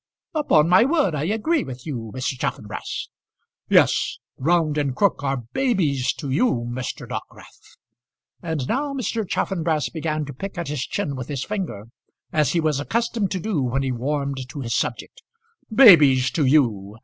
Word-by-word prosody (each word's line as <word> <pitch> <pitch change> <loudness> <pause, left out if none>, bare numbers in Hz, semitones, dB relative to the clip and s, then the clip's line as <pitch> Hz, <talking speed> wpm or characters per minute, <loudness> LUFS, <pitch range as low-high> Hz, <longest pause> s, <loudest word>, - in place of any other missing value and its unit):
"Upon 170 - +3
my 185 +5 +6
word 290 - +2
I 150 0 -1
agree 225 - 0
with 125 -1 -9
you, 120 -8 -5
Mr. 130 +1 -2
Chaffanbrass." - - -4 0.6
"Yes; - - +3 0.2
Round 160 +1 +1
and 140 -3 -1
Crook 200 -5 +1
are 135 -3 -1
babies 160 - +1
to 140 -5 -6
you, 135 - +1
Mr. 125 +1 -5
Dockwrath;" - - -10 0.6
and 160 -6 -3
now 280 +3 -1
Mr. 230 -6 -2
Chaffanbrass 160 -5 0
began 155 -2 -2
to 140 - -8
pick 195 +8 -7
at 170 -4 -3
his 145 -4 -3
chin 140 - -2
with 130 -2 -6
his 140 -3 -3
finger, 185 - -4 0.5
as 150 -4 +2
he 170 - +2
was 155 -3 +1
accustomed 225 +4 -1
to 190 - -2
do 180 -5 -1
when 130 +2 0
he 135 - -1
warmed 135 +1 -3
to 140 +2 -6
his 115 -2 -3
subject. - - -3 0.5
"Babies 150 - +7
to 160 -4 +1
you! 115 -8 +2
150 Hz, 165 wpm, -23 LUFS, 130-190 Hz, 0.6 s, Babies